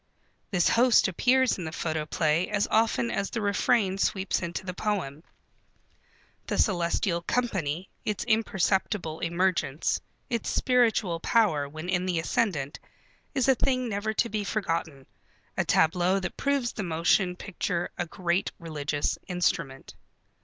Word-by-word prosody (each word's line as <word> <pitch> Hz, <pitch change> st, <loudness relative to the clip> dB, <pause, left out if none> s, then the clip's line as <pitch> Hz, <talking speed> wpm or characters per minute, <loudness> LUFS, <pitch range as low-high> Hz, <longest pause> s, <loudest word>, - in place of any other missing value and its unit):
This 180 Hz, -5 st, +2 dB
host 240 Hz, -1 st, +5 dB
appears 250 Hz, +6 st, +2 dB
in -, -, -4 dB
the 160 Hz, -, -4 dB
photoplay 155 Hz, +1 st, 0 dB
as 205 Hz, -1 st, 0 dB
often 215 Hz, -, +2 dB
as 195 Hz, -, -1 dB
the 230 Hz, -, -3 dB
refrain 200 Hz, -1 st, +1 dB
sweeps 195 Hz, -1 st, 0 dB
into 175 Hz, +1 st, -4 dB
the 185 Hz, -, -4 dB
poem. 175 Hz, -7 st, -3 dB, 1.2 s
The -, -, -1 dB
celestial 175 Hz, -1 st, +1 dB
company, 185 Hz, -7 st, -1 dB, 0.2 s
its 210 Hz, -2 st, -2 dB
imperceptible 190 Hz, -5 st, 0 dB
emergence, 170 Hz, -4 st, 0 dB, 0.3 s
its 235 Hz, -2 st, -2 dB
spiritual 230 Hz, -8 st, +2 dB
power 165 Hz, -9 st, +2 dB
when 155 Hz, +3 st, -7 dB
in 180 Hz, 0 st, 0 dB
the 180 Hz, -2 st, 0 dB
ascendant, 160 Hz, -4 st, -1 dB, 0.6 s
is 265 Hz, -2 st, +2 dB
a 265 Hz, -, +7 dB
thing 255 Hz, 0 st, 0 dB
never 205 Hz, +1 st, -1 dB
to 220 Hz, -, +1 dB
be 210 Hz, 0 st, -2 dB
forgotten, 165 Hz, -10 st, -2 dB, 0.5 s
a -, -, +1 dB
tableau 180 Hz, +4 st, +3 dB
that 175 Hz, -2 st, -4 dB
proves 280 Hz, -4 st, 0 dB
the 215 Hz, -, -4 dB
motion 180 Hz, +1 st, +2 dB
picture 175 Hz, -2 st, -3 dB
a 175 Hz, -, -3 dB
great 175 Hz, +2 st, -1 dB
religious 150 Hz, -4 st, -2 dB
instrument. 165 Hz, -6 st, -1 dB
185 Hz, 135 wpm, -27 LUFS, 165-215 Hz, 1.2 s, a